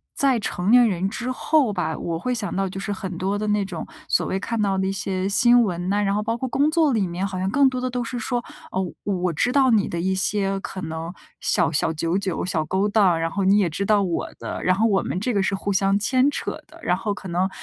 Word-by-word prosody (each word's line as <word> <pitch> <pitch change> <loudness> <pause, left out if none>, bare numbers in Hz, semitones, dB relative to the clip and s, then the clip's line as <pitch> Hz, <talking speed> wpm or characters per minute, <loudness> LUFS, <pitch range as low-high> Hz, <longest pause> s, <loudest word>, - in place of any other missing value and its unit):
在 270 -4 +2
成 195 -1 -1
年 245 -1 +7
人 190 -2 -1
之 245 +4 -4
后 265 -2 +2
吧， 175 -4 -2
我 170 -1 -3
会 250 +9 -2
想 215 -6 -3
到 195 0 0
就 195 - -6
是 205 +1 -3
很 185 -2 -5
多 195 +3 -1
的 210 - -2
那 210 -1 +1
种 180 -4 -6 0.2
所 - - +2
谓 190 - -1
看 230 +2 -2
到 195 -2 +1
的 190 0 0
一 - - 0
些 190 -1 -2
新 240 +4 +5
闻 180 -4 -1
呐， 205 +1 +1
然 200 -1 +1
后 210 - 0
包 230 +2 -1
括 260 - -3
工 285 +4 +2
作 315 -4 +3
里 215 -4 +1
面 180 +2 -2
好 190 -1 -5
像 185 +1 -1
更 280 +3 +5
多 255 -1 -1
的 255 - -1
都 250 0 -2
是 240 +1 -4
说， 240 +1 -2 0.3
哦， 190 - -1 0.2
我 205 - -1
我 180 -2 -1
知 245 +10 +1
道 265 -1 +4
你 215 -4 +3
的 170 - -3
一 190 +2 0
些 195 +1 0
可 190 - -6
能 160 +1 -5 0.3
小 175 -4 +2
小 160 +1 +1
九 165 +3 -1
九 195 -4 -2
小 170 -4 0
勾 190 +5 0
当， 200 -5 +3
然 165 0 0
后 195 +4 -2
你 195 +2 +5
也 195 -4 +2
知 195 +5 -3
道 205 -1 +3
我 175 -3 -2
的， - - -5
然 185 - +3
后 215 +5 +2
我 195 -3 +2
们 180 - -2
这 245 +5 -1
个 200 -2 +2
是 195 - 0
互 200 +1 -2
相 195 +1 +2
牵 255 +6 +2
扯 - - -3
的。 325 +2 -17
然 180 - +1
后 205 +3 -2
可 200 - -9
能 180 +2 0
195 Hz, 295 characters per minute, -23 LUFS, 185-230 Hz, 0.3 s, 年